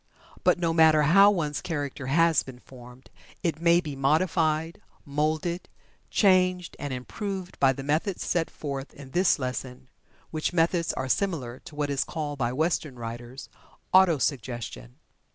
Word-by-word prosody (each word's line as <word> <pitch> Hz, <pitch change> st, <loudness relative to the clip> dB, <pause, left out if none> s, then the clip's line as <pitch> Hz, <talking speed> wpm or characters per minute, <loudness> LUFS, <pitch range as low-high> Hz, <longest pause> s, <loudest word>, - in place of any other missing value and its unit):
But -, -, +4 dB
no 170 Hz, -2 st, 0 dB
matter 160 Hz, -2 st, +5 dB
how 195 Hz, +7 st, +7 dB
one's 155 Hz, -7 st, -1 dB
character 145 Hz, -4 st, -4 dB
has 165 Hz, +2 st, +4 dB
been 130 Hz, -2 st, -10 dB
formed, 125 Hz, 0 st, -15 dB, 0.3 s
it 165 Hz, -3 st, -1 dB
may 170 Hz, 0 st, +5 dB
be 150 Hz, -5 st, -5 dB
modified, 160 Hz, +2 st, +1 dB, 0.2 s
moulded, 155 Hz, +4 st, -1 dB, 0.4 s
changed, 185 Hz, -3 st, +2 dB
and 145 Hz, -, -4 dB
improved 185 Hz, +9 st, -5 dB
by 135 Hz, -1 st, +5 dB
the 135 Hz, +1 st, -6 dB
methods 155 Hz, +7 st, -1 dB
set 165 Hz, -2 st, 0 dB
forth 140 Hz, -2 st, -6 dB
in 135 Hz, -2 st, -12 dB
this 180 Hz, +3 st, +3 dB
lesson, 125 Hz, -1 st, -5 dB, 0.4 s
which 155 Hz, +2 st, -2 dB
methods 170 Hz, 0 st, +2 dB
are 130 Hz, -, -3 dB
similar 130 Hz, -7 st, -1 dB
to 165 Hz, -4 st, -11 dB
what 145 Hz, -1 st, -1 dB
is 140 Hz, -, +1 dB
called 150 Hz, -3 st, -5 dB
by 120 Hz, -1 st, 0 dB
Western 155 Hz, -1 st, -1 dB
writers, 120 Hz, +3 st, -7 dB, 0.5 s
"Auto 185 Hz, -4 st, +6 dB
suggestion." 120 Hz, -, -4 dB
150 Hz, 150 wpm, -27 LUFS, 135-170 Hz, 0.5 s, how